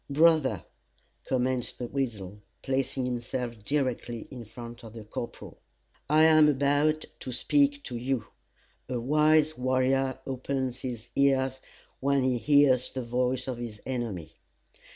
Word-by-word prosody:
"Brother," 145 - +3 0.6
commenced 130 -1 0
The 125 - -4
Weasel, 110 -7 -4 0.2
placing 135 -1 -1
himself 120 -2 -4
directly 125 -4 -2
in 125 -3 -8
front 120 +2 -10
of 110 -2 -10
the 115 -2 -8
corporal, 115 +2 -7 0.5
"I 155 +1 +5
am 155 -1 +7
about 145 +2 +2
to 130 - -6
speak 285 - +2
to 125 - -6
you. 125 -1 -1 0.6
A 125 -2 -1
wise 150 +3 +3
warrior 130 +1 +1
opens 130 -1 -3
his 120 -2 -6
ears, 130 -1 +2 0.4
when 140 0 +2
he 130 -2 +1
hears 140 0 +4
the 130 - -4
voice 125 +2 -1
of 125 -2 -3
his 115 -3 -6
enemy. 115 -10 -4
130 Hz, 130 wpm, -28 LUFS, 120-140 Hz, 0.6 s, am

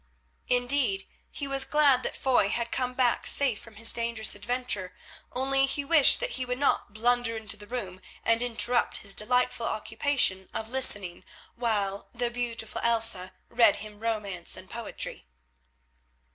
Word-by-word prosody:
Indeed 245 -5 +1 0.2
he 280 - -6
was 275 -1 0
glad 285 -3 +3
that - - -4
Foy 250 -7 +2
had 235 +2 -2
come 250 -1 -2
back 250 -2 +1
safe 265 -7 +2
from 230 -2 -14
his 225 +2 +4
dangerous 230 -2 +1
adventure, 210 -4 -3 0.4
only 270 +1 +2
he 280 +1 -1
wished 300 -2 +6
that - - -2
he 260 - -1
would 250 0 -3
not 280 -6 0
blunder 235 +1 +1
into 220 -1 -2
the 205 0 -12
bedroom 190 -7 -5 0.2
and 230 0 +2
interrupt 240 0 +1
his 200 - -3
delightful 245 +2 0
occupation 220 -4 0
of 220 0 -3
listening, 205 -9 +1 0.3
while 205 -4 -2
the 240 0 -1
beautiful 235 -2 -4
Elsa 225 -5 +2 0.2
read 230 -3 +4
him 210 0 -9
romance 210 -6 -4
and 185 - -12
poetry. 225 - -5
235 Hz, 150 wpm, -27 LUFS, 210-250 Hz, 0.4 s, wished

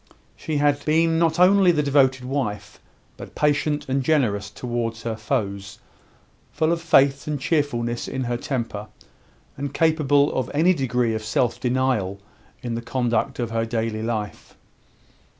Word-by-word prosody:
She 155 -2 -3
had 145 0 +1
been 165 +1 +2
not 165 -1 +2
only 185 0 +6
the 150 -3 +1
devoted 135 -2 +2
wife, 125 -6 -4 0.4
but - - -11
patient 150 0 0
and 135 +1 0
generous 120 -9 +1
towards 115 +1 -4
her 115 -1 -2
foes, 105 -3 -3 0.7
full 155 +2 0
of 170 -1 -1
faith 140 -4 +3
and 150 -2 -2
cheerfulness 130 -6 -1
in 130 - -3
her 120 0 -2
temper, 115 -5 -4 0.7
and 140 0 -5
capable 150 -3 +3
of 130 -2 -2
any 170 +5 +4
degree 125 -6 0
of 110 0 -3
self 110 +2 0
denial 125 -6 0 0.4
in 120 -1 -3
the 115 - -3
conduct 120 +1 -1
of 120 -2 -3
her 115 0 0
daily 115 -1 -2
life. 110 -2 -5
130 Hz, 150 wpm, -23 LUFS, 115-145 Hz, 0.7 s, only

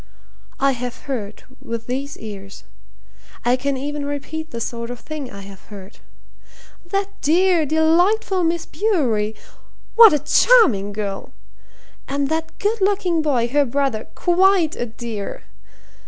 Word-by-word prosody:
I 275 0 +3
have 250 -1 -6
heard 220 -7 -5 0.2
with 230 0 -5
these 275 +3 -4
ears. 195 -2 -9 0.8
I 245 +1 +4
can 275 +1 -2
even 290 +2 -4
repeat 290 +3 -5
the 235 - -6
sort 235 0 -4
of 245 -1 -6
thing 300 -2 -7
I 200 -3 -10
have 195 -1 -13
heard. 200 -1 -12 0.9
'That 395 +2 -3
dear, 340 +1 +3
delightful 355 +6 +2
Miss 330 0 0
Bewery 245 - 0 0.6
what 455 -3 +9
a 300 - +3
charming 295 - +4
girl! 200 -1 -5 0.7
And 280 0 -1
that 320 0 -3
good 425 +1 -1
looking 380 -4 +1
boy, 260 -6 +1
her 290 +3 +3
brother 270 -4 -1
quite 360 -2 +3
a 240 - -3
dear! 220 -2 -6
280 Hz, 135 wpm, -21 LUFS, 230-340 Hz, 0.9 s, what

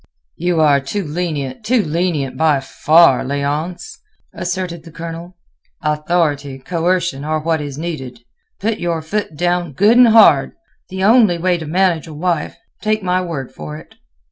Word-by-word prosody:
"You 175 0 0
are 145 -2 +4
too 165 +10 -4
lenient, 150 - -4
too 235 0 +2
lenient 155 -5 -1
by 150 0 +2
far, 155 0 +4
Léonce," 145 +6 -3 0.4
asserted 175 -1 -4
the 165 - -13
Colonel. 170 +2 -8 0.5
"Authority, 150 -3 0
coercion 170 0 -1
are 155 +1 -1
what 160 0 -1
is 145 -2 -6
needed. 135 -7 -6 0.4
Put 220 +2 -1
your 170 -2 -2
foot 200 -1 -3
down 175 -1 0
good 205 - +4
and 250 -1 +8
hard; 210 -11 +5 0.4
the 190 0 -4
only 215 -4 +5
way 175 0 0
to 160 - -7
manage 175 -1 +1
a 155 - -9
wife. 165 0 -2 0.2
Take 215 -1 0
my 180 0 +1
word 160 -8 -5
for 75 0 -8
it." 75 - -15
165 Hz, 155 wpm, -17 LUFS, 150-180 Hz, 0.5 s, and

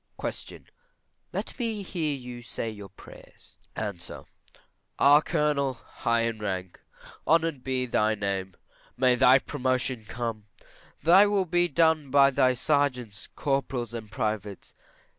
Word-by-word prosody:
Q. - - -6 0.7
Let - - -5
me 225 -4 -2
hear 160 -6 -2
you 125 -2 -8
say 115 -1 -5
your 105 -2 -10
prayers. - - -16 0.2
A. 105 -1 -2 1.0
Our 145 +2 +6
Colonel, 145 -3 0
high 115 -1 -2
in 115 -1 -2
rank, 95 -3 -4 0.5
honoured 165 -5 +2
be 130 -1 0
thy 110 -3 +1
name; 95 -2 -3 0.4
may 125 0 +4
thy 130 +1 +6
promotion 130 -4 -2
come; 115 -2 -5 0.6
thy 185 +5 +7
will 200 -2 +1
be 175 0 +2
done 160 -2 +2
by 140 0 +5
thy 130 -1 +3
sergeants, 125 -6 -1
corporals, 135 -4 -2
and 110 -2 -7
privates. 105 -4 -4
130 Hz, 125 wpm, -27 LUFS, 110-145 Hz, 1.0 s, thy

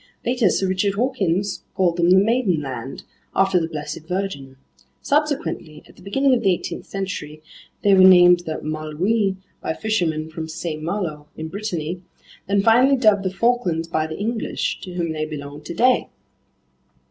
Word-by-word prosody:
Later 245 -5 +2
Sir 190 - 0
Richard 190 +2 0
Hawkins 200 -5 0
called 180 -3 +1
them 170 0 +3
the 185 - +7
Maidenland, 170 - 0 0.3
after 195 -1 +3
the 165 - -2
Blessed 155 0 -6
Virgin. 170 -8 -4 0.4
Subsequently, 285 - -1
at - - -19
the - - -18
beginning 270 +8 +2
of 240 - +2
the 190 -5 +3
18th - - -7
century, 155 -6 -5 0.4
they 200 - +5
were 190 - +5
named 180 -1 +8
the 160 -3 -5
Malouines 175 +7 -1 0.2
by 160 - -2
fishermen 165 -8 -1
from 160 0 -6
Saint 160 -1 -5
Malo 160 -4 -3
in 160 0 -5
Brittany, 175 -3 -4 0.5
then 200 0 +2
finally 250 +5 +5
dubbed 215 -5 +4
the 190 - -1
Falklands 190 -6 0
by 160 -1 -1
the 160 - -6
English, 225 +2 -2
to 180 -2 -8
whom 170 -2 -1
they 155 -1 -3
belong 145 -1 -7
today. 240 +12 +1
180 Hz, 160 wpm, -22 LUFS, 155-205 Hz, 0.5 s, named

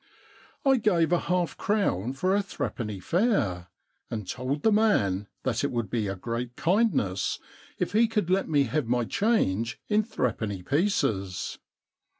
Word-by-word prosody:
I 270 -1 +5
gave 175 -8 +2
a 175 - +4
half 180 -1 0
crown 165 - 0
for 185 +8 +1
a 205 - +3
threepenny 110 - -4
fare, 110 - +1 0.4
and 105 -4 -4
told 130 +6 -3
the 220 - +5
man 105 - +2 0.2
that 125 -1 0
it 140 - +1
would 115 -5 -2
be 110 -4 0
a 95 - -2
great 120 +5 -4
kind 210 +6 +3
ness 95 -5 0 0.4
if - - -1
he 225 +2 +5
could 210 -6 -1
let 190 -2 +2
me 145 -3 +4
have 140 0 -1
my 120 0 +1
change 115 - +1
in 210 0 +4
threepenny 110 - -2
pieces. 110 - 0
135 Hz, 155 wpm, -27 LUFS, -, 0.4 s, I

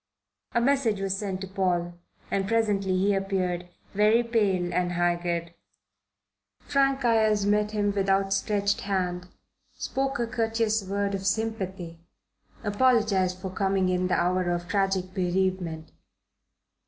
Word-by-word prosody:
A - - +3
message 240 -5 +2
was 195 -1 -1
sent 195 -2 -4
to 195 - -5
Paul, 180 -2 -1 0.4
and 195 -1 0
presently 205 -4 +1
he 200 +2 +2
appeared, 185 -2 -1 0.2
very 215 +4 +4
pale 200 -7 0
and 180 0 0
haggard. 175 -1 -1 1.1
Frank 275 -2 +1
Ayres 215 -3 +3
met 210 +1 +2
him 205 -1 0
with 195 -1 -1
outstretched 200 +1 +1
hand, 180 -2 -2 0.5
spoke 270 +1 -2
a 235 - 0
courteous 225 -1 0
word 200 +1 -2
of 195 0 -2
sympathy, 190 -6 -3 0.6
apologized 205 -4 +2
for 185 0 -6
coming 190 -1 +1
in 180 0 +1
the 180 - +1
hour 180 0 +1
of 175 0 -2
tragic 190 -1 0
bereavement. 180 -3 -1
195 Hz, 130 wpm, -27 LUFS, 185-215 Hz, 1.1 s, very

